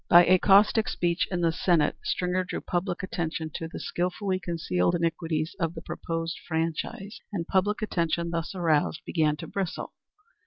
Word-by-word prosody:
By 175 0 +9
a 185 0 +5
caustic 210 +3 +5
speech 170 0 0
in 180 -2 -1
the 165 -1 +3
Senate 170 -2 +2
Stringer 180 +1 0
drew 180 - -4
public 180 +1 -2
attention 165 -4 -3
to 165 - -4
the 160 - -7
skilfully 185 +2 -1
concealed 165 - 0
iniquities 165 -1 -1
of 165 -1 -1
the 160 - -7
proposed 165 0 -4
franchise, 165 +6 -3
and 175 -5 -2
public 205 +4 +1
attention 170 -3 0
thus 170 +2 -3
aroused 160 -4 +1
began 155 -3 +1
to 150 - -7
bristle. 195 -4 -4
170 Hz, 160 wpm, -27 LUFS, 165-185 Hz, -, By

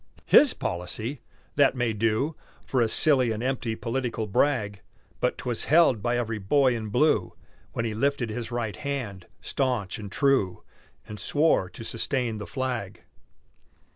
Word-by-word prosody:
"His - - +6
policy?" 110 +10 -3 0.4
That 140 -2 +4
may 120 -3 0
do 115 +8 0 0.3
For 130 - 0
a 115 - +3
silly 130 +1 +4
and 110 +1 -3
empty 125 -3 -1
political 115 -1 -3
brag; 105 -2 0 0.4
But - - 0
'twas 120 -2 -2
held 155 -8 +4
by 120 +2 0
every 115 -2 -2
Boy 130 +5 +3
in 110 -2 -4
Blue 110 - +2 0.4
When 115 - -2
he 110 - -2
lifted 120 0 0
his 115 +1 -5
right 120 -3 -3
hand, 125 -11 -5
stanch 120 -7 -1
and 100 -2 -8
true, 135 -10 +1 0.4
And 105 -1 -8
swore 145 - +2
to 115 - -10
sustain 115 -1 -1
the 105 - -7
flag. 125 -7 -4
120 Hz, 150 wpm, -26 LUFS, 105-135 Hz, 0.4 s, His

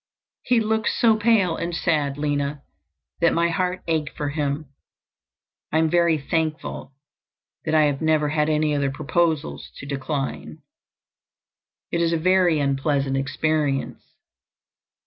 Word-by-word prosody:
"He 245 -2 +2
looked 220 0 0
so 225 -2 +3
pale 210 -6 +2
and 170 0 -3
sad, 150 -5 0
Lina, 145 -1 -2 0.6
that 170 -1 +3
my 170 0 +2
heart 180 +1 -1
ached 160 -3 -2
for 145 -1 -2
him. 145 0 -2 1.1
I 155 - +2
am 160 -1 +2
very 170 -2 +3
thankful 155 -1 -3 0.7
that 160 - +1
I 155 - +5
have 145 -2 0
never 155 -2 +2
had 150 0 +1
any 155 -1 +1
other 140 -1 +1
proposals 155 +2 -1
to - - -9
decline. 140 0 -4 1.3
It 170 - 0
is 170 0 +2
a - - +2
very 180 -1 +3
unpleasant 140 -1 0
experience. 140 +1 -1
155 Hz, 130 wpm, -23 LUFS, 145-170 Hz, 1.3 s, I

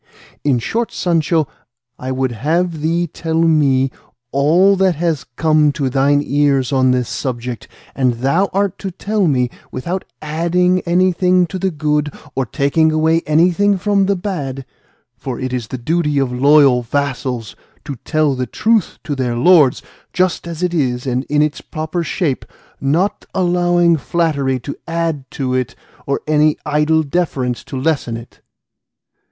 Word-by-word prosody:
In 140 -4 +2
short, 225 - -2
Sancho, 165 -2 +1 0.5
I 130 +1 -4
would 130 -1 -1
have 160 +7 -1
thee 165 +3 +1
tell 160 0 -3
me 140 -5 +3 0.4
all 170 +8 +4
that 190 -2 +2
has 160 -2 -1
come 155 -2 +3
to 140 -4 -2
thine 140 +2 +2
ears 140 -1 +1
on 130 -1 +3
this 125 -2 +1
subject; 125 -3 -4 0.3
and 130 -3 +1
thou 140 +11 +1
art 200 -1 -1
to 195 - -4
tell 200 +1 -1
me, 125 -4 +1 0.2
without 175 +9 -3 0.2
adding 175 +4 +1
anything 180 +1 +3
to 185 +2 -6
the 190 - 0
good 150 -2 -1 0.2
or 135 -2 -2
taking 155 +6 +2
away 160 +1 +2
anything 180 +6 +3
from 200 0 +1
the 200 - +2
bad; 145 -9 -4 0.5
for 125 +2 -6
it 130 0 -3
is 120 -3 -3
the 130 - -5
duty 150 +3 0
of 135 -2 +1
loyal 140 -1 +5
vassals 125 -3 -3 0.3
to 140 - -5
tell 155 +3 0
the 125 -1 -3
truth 220 - +1
to 150 - -3
their 125 -3 -1
lords 150 -1 +4 0.3
just 185 -1 0
as 170 +1 -5
it 180 -1 0
is 125 -6 -1
and 130 0 -1
in 150 +1 +2
its 150 -1 -2
proper 160 +2 -4
shape, 155 -3 -1 0.4
not 165 +9 0
allowing 175 -2 +3
flattery 140 -3 0
to 140 +3 -6
add 165 -5 -2
to 130 -2 -3
it 130 -1 -2 0.3
or 140 - -1
any 150 0 +3
idle 150 +1 +2
deference 140 -6 -2
to 135 - -6
lessen 135 -5 -1
it. 115 +1 -13
150 Hz, 155 wpm, -17 LUFS, 130-175 Hz, 0.5 s, loyal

